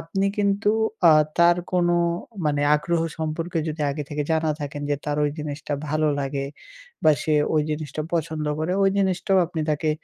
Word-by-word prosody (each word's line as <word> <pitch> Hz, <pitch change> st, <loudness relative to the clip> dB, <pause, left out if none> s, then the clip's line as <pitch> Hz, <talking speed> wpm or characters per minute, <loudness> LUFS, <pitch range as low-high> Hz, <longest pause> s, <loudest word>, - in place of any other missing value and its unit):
আপনি 195 Hz, +4 st, -1 dB
কিন্তু 200 Hz, +1 st, +2 dB, 0.4 s
আ -, -, +8 dB, 0.3 s
তার 170 Hz, 0 st, +6 dB, 0.2 s
কোনো 175 Hz, -1 st, +3 dB, 0.5 s
মানে 145 Hz, -1 st, +1 dB
আগ্রহ 170 Hz, +3 st, -1 dB, 0.2 s
সম্পর্কে 165 Hz, +2 st, -2 dB
যদি 155 Hz, 0 st, -3 dB
আগে 150 Hz, +2 st, -3 dB
থেকে 150 Hz, 0 st, -1 dB
জানা 160 Hz, 0 st, +1 dB
থাকেন, 145 Hz, 0 st, -5 dB
যে 145 Hz, -, +2 dB
তার 145 Hz, 0 st, -1 dB
ওই 145 Hz, -, +1 dB
জিনিসটা 150 Hz, -1 st, -5 dB, 0.2 s
ভালো 155 Hz, +1 st, +1 dB
লাগে 140 Hz, 0 st, -2 dB, 0.6 s
বা 155 Hz, -, +7 dB
সে 155 Hz, -, +1 dB, 0.2 s
ওই 155 Hz, -, +3 dB
জিনিসটা 150 Hz, 0 st, -3 dB
পছন্দ 160 Hz, -2 st, -2 dB, 0.2 s
করে। 170 Hz, +3 st, -1 dB
ওই 195 Hz, -, +4 dB
জিনিসটাও 190 Hz, 0 st, +2 dB
আপনি 165 Hz, -1 st, -4 dB
তাকে 155 Hz, +1 st, 0 dB
155 Hz, 175 wpm, -24 LUFS, 150-175 Hz, 0.6 s, আ